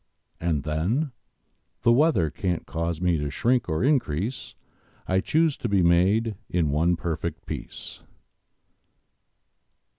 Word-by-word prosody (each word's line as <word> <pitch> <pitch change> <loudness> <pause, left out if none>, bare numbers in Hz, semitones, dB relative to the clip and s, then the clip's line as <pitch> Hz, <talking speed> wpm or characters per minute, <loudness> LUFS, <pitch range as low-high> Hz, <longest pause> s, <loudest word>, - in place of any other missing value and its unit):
And, 80 -4 0
then, 95 - 0 0.7
The 115 - +5
weather 120 - +3
can't 90 +1 -2
cause 80 +2 -3
me 90 -3 +1
to 75 0 -2
shrink 120 - +1
or 80 +2 0
increase: 120 - 0 0.5
I 95 0 +2
chose 155 +8 +2
to 120 - -3
be 100 -3 +3
made 95 +7 +3 0.2
in 85 -5 +1
one 85 +4 +2
perfect 85 -1 -4
piece! - - -6
90 Hz, 120 wpm, -25 LUFS, 80-115 Hz, 0.7 s, The